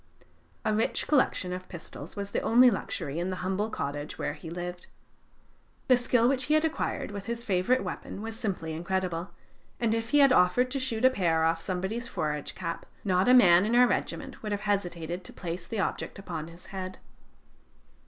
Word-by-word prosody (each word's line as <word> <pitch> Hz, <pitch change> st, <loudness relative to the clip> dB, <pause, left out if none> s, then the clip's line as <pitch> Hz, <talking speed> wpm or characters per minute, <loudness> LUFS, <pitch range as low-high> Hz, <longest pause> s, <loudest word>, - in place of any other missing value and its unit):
A 215 Hz, -, +2 dB
rich 220 Hz, +1 st, 0 dB
collection 255 Hz, -10 st, +2 dB
of 185 Hz, 0 st, -7 dB
pistols 165 Hz, -2 st, -9 dB
was 200 Hz, -1 st, -5 dB
the -, -, 0 dB
only 245 Hz, +2 st, +6 dB
luxury 145 Hz, -6 st, -3 dB
in 175 Hz, -, -1 dB
the 185 Hz, -, -2 dB
humble 195 Hz, +3 st, 0 dB
cottage 145 Hz, -5 st, -4 dB
where 145 Hz, -, -2 dB
he 160 Hz, +2 st, -9 dB
lived. 175 Hz, +1 st, -6 dB, 1.0 s
The 255 Hz, -, +8 dB
skill 240 Hz, -1 st, +3 dB
which 260 Hz, 0 st, +2 dB
he 305 Hz, -, +3 dB
had 310 Hz, +1 st, +3 dB
acquired 315 Hz, -8 st, -2 dB
with 200 Hz, -1 st, -6 dB
his 235 Hz, 0 st, -3 dB
favorite 195 Hz, +3 st, +2 dB
weapon 195 Hz, +2 st, -6 dB
was 225 Hz, 0 st, -5 dB
simply 195 Hz, -8 st, -3 dB
incredible: 175 Hz, +1 st, -2 dB, 0.5 s
and 230 Hz, -2 st, +2 dB
if 225 Hz, 0 st, -2 dB
he 290 Hz, -, +3 dB
had 275 Hz, -2 st, +7 dB
offered 245 Hz, +8 st, +4 dB
to 275 Hz, -, -1 dB
shoot 255 Hz, -2 st, 0 dB
a 260 Hz, -, +7 dB
pear 165 Hz, -8 st, +1 dB
off 165 Hz, 0 st, +2 dB
somebody's 190 Hz, +7 st, -2 dB
forage 150 Hz, -8 st, -3 dB
cap, 165 Hz, -, -5 dB, 0.2 s
not 185 Hz, +2 st, +2 dB
a 250 Hz, -, +8 dB
man 180 Hz, -7 st, +7 dB
in 225 Hz, +3 st, +1 dB
our 250 Hz, +1 st, +7 dB
regiment 245 Hz, -, -2 dB
would 215 Hz, -, -4 dB
have 205 Hz, 0 st, -1 dB
hesitated 175 Hz, -4 st, -2 dB
to -, -, -11 dB
place 170 Hz, -1 st, -5 dB
the 225 Hz, -, -3 dB
object -, -, -2 dB
upon 160 Hz, -5 st, -5 dB
his 170 Hz, +1 st, -13 dB
head. 185 Hz, -1 st, -5 dB
195 Hz, 195 wpm, -28 LUFS, 175-235 Hz, 1.0 s, The